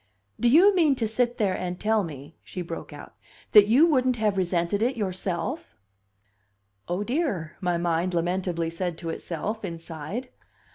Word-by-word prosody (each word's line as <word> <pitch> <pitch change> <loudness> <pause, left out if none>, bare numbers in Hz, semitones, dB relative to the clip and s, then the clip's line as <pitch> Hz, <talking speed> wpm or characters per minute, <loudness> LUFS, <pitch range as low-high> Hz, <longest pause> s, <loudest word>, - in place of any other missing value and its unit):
"Do 240 - +3
you 370 +9 +6
mean 315 -6 +4
to 230 -3 -1
sit 240 +2 0
there 200 -5 +1
and 180 -1 -4
tell 220 -1 +2
me," 145 -2 -9
she 180 - -6
broke 165 -1 -7
out, - - -11 0.4
"that 210 -2 +8
you 255 +9 +6
wouldn't 255 -6 +2
have 215 -2 +1
resented 180 +1 0
it 250 +2 +1
yourself?" 185 - -3 1.1
"O 180 +4 -1
dear!" 225 - -2
my 175 -2 +1
mind 170 +1 0
lamentably 175 -1 -1
said 175 0 -3
to 165 -2 -4
itself, 210 +7 -4
inside. 170 - -6
190 Hz, 155 wpm, -26 LUFS, 170-235 Hz, 1.1 s, that